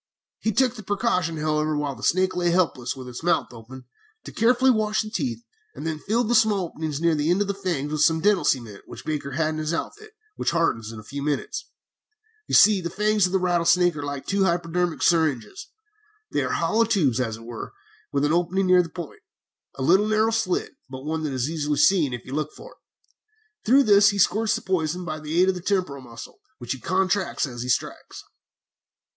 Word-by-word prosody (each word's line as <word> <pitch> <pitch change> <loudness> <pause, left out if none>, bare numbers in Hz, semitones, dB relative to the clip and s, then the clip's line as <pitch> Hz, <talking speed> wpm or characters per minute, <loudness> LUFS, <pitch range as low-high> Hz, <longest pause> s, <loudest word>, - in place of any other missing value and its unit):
"He 220 - 0
took 250 +3 +2
the 225 - -9
precaution, 185 -5 -1
however, 155 0 0
while 145 -1 -2
the 115 - -13
snake 185 +1 +1
lay 175 -1 +1
helpless 155 -8 0
with 130 -1 -9
its 125 -1 -8
mouth 170 -6 0
open, 125 +3 -12 0.4
to - - -9
carefully 250 +3 +3
wash 215 -2 0
the 215 - -8
teeth, 240 0 -3 0.3
and - - -7
then 160 -1 -3
filled 225 +7 0
the 240 - +1
small 215 -5 +3
openings 155 -3 -4
near 170 0 +2
the 150 +1 0
end 180 +3 +3
of 205 - 0
the 200 - -1
fangs 175 -7 -3
with 155 -1 -1
some 160 +1 +4
dental 205 +1 +2
cement 115 -6 -1
which - - -11
Baker 145 -3 -3
had 155 +2 0
in 155 - -4
his 155 +2 -1
outfit, 430 - -6 0.2
which - - 0
hardens 115 -10 0
in 110 - -9
a - - -11
few 140 +6 -7
minutes. 145 0 -3 0.8
You - - 0
see, 205 -3 +6
the 170 - -3
fangs 210 +1 +2
of 185 - -3
a - - +6
rattlesnake 175 -1 +2
are 145 - -5
like 145 -1 -5
two 195 0 +1
hypodermic 175 -1 -1
syringes. 150 -10 +1 0.6
They - - 0
are - - -2
hollow 230 +1 +2
tubes, 140 - +1
as 115 -3 -2
it 115 - -13
were, 115 -1 -7 0.4
with 140 0 +1
an 150 - +1
opening 175 +3 +1
near 180 0 +5
the 170 - -6
point, 170 -2 -9 0.5
a 130 - -4
little 190 +9 +4
narrow 215 +1 +2
slit, 225 -5 -1
but 130 +1 -8
one 160 +1 -2
that 145 - -3
is 130 0 -1
easily 150 -2 -2
seen, 155 -1 +4
if 120 -1 -6
you 130 - -8
look 150 +1 -3
for - - -12
it. - - -20 0.9
Through 270 +5 +5
this 200 -2 +6
he 205 - -2
squirts 215 +3 +2
the - - -5
poison 180 -1 -1
by 155 -2 -4
the 155 +2 -2
aid 185 +1 +5
of - - +2
the 180 - -7
temporal 180 -8 -1
muscle, 115 -2 -11 0.2
which 120 -1 -7
he 130 - -3
contracts 190 - 0
as 120 -4 -7
he 125 - -5
strikes. - - -3
170 Hz, 220 wpm, -24 LUFS, 145-195 Hz, 0.9 s, see